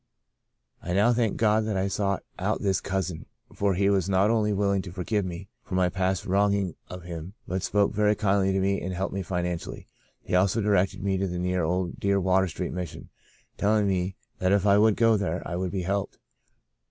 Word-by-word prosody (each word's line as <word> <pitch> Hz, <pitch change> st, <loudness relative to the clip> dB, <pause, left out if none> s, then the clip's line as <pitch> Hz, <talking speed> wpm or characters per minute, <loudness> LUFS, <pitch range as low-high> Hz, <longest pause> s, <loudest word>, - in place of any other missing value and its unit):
I 90 Hz, -, -3 dB
now 105 Hz, +6 st, +4 dB
thank 115 Hz, -3 st, 0 dB
God 110 Hz, 0 st, +3 dB
that 105 Hz, -3 st, -1 dB
I 95 Hz, +1 st, +1 dB
sought 100 Hz, 0 st, -1 dB, 0.2 s
out -, -, -1 dB
this 95 Hz, -2 st, +1 dB
cousin, 95 Hz, -4 st, -3 dB, 0.3 s
for 100 Hz, -2 st, +1 dB
he 100 Hz, +2 st, +2 dB
was 100 Hz, -2 st, +2 dB
not 100 Hz, +3 st, +3 dB
only 110 Hz, -2 st, +2 dB
willing 100 Hz, -1 st, +1 dB
to 90 Hz, -, -9 dB
forgive 100 Hz, +3 st, -1 dB
me 90 Hz, +1 st, -6 dB, 0.2 s
for 95 Hz, -, -5 dB
my 90 Hz, -1 st, +3 dB
past 95 Hz, +1 st, -1 dB
wronging 100 Hz, -1 st, +1 dB, 0.2 s
of 90 Hz, -1 st, -8 dB
him 85 Hz, +2 st, -7 dB
but 95 Hz, +1 st, -2 dB
spoke 100 Hz, +2 st, +1 dB
very 105 Hz, 0 st, +3 dB
kindly 100 Hz, -2 st, +2 dB
to 95 Hz, -, +1 dB
me 100 Hz, +1 st, +1 dB
and 95 Hz, +1 st, -4 dB
helped 95 Hz, +2 st, -2 dB
me 95 Hz, -, -2 dB
financially. 90 Hz, -1 st, -4 dB, 0.4 s
He -, -, -6 dB
also 95 Hz, +4 st, +3 dB
directed 100 Hz, -3 st, +1 dB
me 95 Hz, -1 st, 0 dB
to 95 Hz, -, 0 dB
the 90 Hz, -1 st, -4 dB
dear 90 Hz, +1 st, 0 dB
old 90 Hz, +2 st, -2 dB
Water 95 Hz, -1 st, +2 dB
Street 90 Hz, +1 st, -4 dB
Mission, 90 Hz, -2 st, -6 dB, 0.5 s
telling 105 Hz, 0 st, +2 dB
me 95 Hz, -1 st, -1 dB, 0.2 s
that 90 Hz, 0 st, +1 dB
if 100 Hz, 0 st, +3 dB
I 100 Hz, 0 st, +5 dB
would 110 Hz, -1 st, +4 dB
go 115 Hz, -2 st, +4 dB
there 95 Hz, -3 st, -3 dB
I 85 Hz, -, -4 dB
would 90 Hz, +1 st, -2 dB
be 95 Hz, 0 st, -3 dB
helped. 100 Hz, +2 st, -2 dB
95 Hz, 205 wpm, -26 LUFS, 90-100 Hz, 0.5 s, I